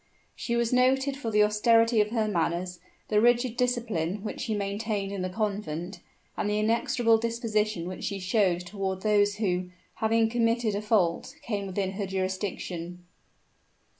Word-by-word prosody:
She 235 - -2
was 235 0 +1
noted 265 +2 +3
for 270 -5 -4
the 210 -1 +4
austerity 225 +2 +4
of 210 - 0
her 220 -1 0
manners, 180 -1 -1 0.3
the 210 -1 +3
rigid 240 0 +3
discipline 220 -7 -1
which 215 - -5
she 225 -4 -1
maintained 200 0 -2
in 200 -2 -4
the 185 - -2
convent, 190 -3 -3 0.4
and 205 - -1
the 210 - 0
inexorable 230 +1 +2
disposition 215 -5 -1
which 185 - -6
she 200 - -2
showed 185 -2 +1
toward 190 0 -4
those 205 -1 +3
who, 185 -4 -1 0.3
having 225 0 +2
committed 230 -1 +1
a 200 - -2
fault, 210 +3 +1
came 205 -6 -3
within 190 0 -2
her 195 0 -4
jurisdiction. 185 -2 -4
210 Hz, 155 wpm, -27 LUFS, 190-230 Hz, 0.4 s, the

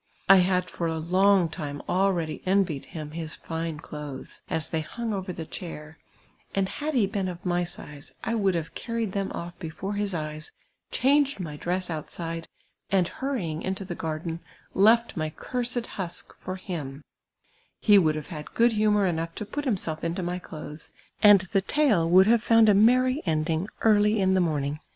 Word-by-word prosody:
I 195 - +9
had 180 0 +2
for 170 - -3
a 160 0 -2
long 185 +3 +3
time 145 -2 -5
ah 195 +2 +3
eady 155 -2 -4
envied 185 -7 +1
him 155 -2 -7
his 160 0 -6
tine 165 -2 -4
clothes, 150 -4 -8
as 160 - -2
they 160 - -1
hung 225 +8 -4
over 190 -1 -3
the 165 -2 -6
chair, 155 -2 -8 0.6
and 195 -1 +2
had 300 +7 -4
he 230 -5 +4
been 195 -1 -2
of 175 0 -7
my 175 0 +1
size, 150 -4 -7
I - - -1
would 195 -5 +2
have 165 -1 -3 0.2
earned 230 -3 -1
them 195 0 -2
off 175 +1 -7
before 180 +4 -5
his 205 -2 -1
eyes, 155 -1 -5 0.4
changed 280 -1 +2
my 155 -5 -5
dress 180 +3 -2
outside, 165 +1 -5 0.4
and 185 -3 +3
hurrying 190 - -3
mto 190 +1 -2
the 175 - -3
garden, 160 0 -4 0.3
left 225 +3 +4
my 155 -1 -1
cursed 245 +7 -3
husk 180 -6 -5
for 185 - -6
him; 155 -7 -6 0.8
he 205 -2 +6
would 155 -4 +2
have 155 -1 -6
had 150 -1 -8
good 235 +1 +5
humour 210 -2 +3
enougli 165 -1 -2
to 210 - -5
])ut 290 0 -2
himself 180 - -2
into 170 +2 -2
mv 180 +1 -3
clotiies, 155 -1 -9 0.3
and 205 -3 +8
the 190 +2 0
tale 210 - +2
would 185 +2 +7
have 230 +1 +4
found 225 -1 +5
a - - +7
nieiTV 255 +6 +4
end 155 0 +1
ing 165 +6 -1
early 210 -1 +4
in 190 -1 +3
the 190 - +3
morning. 150 -3 -1
180 Hz, 185 wpm, -26 LUFS, 160-205 Hz, 0.8 s, I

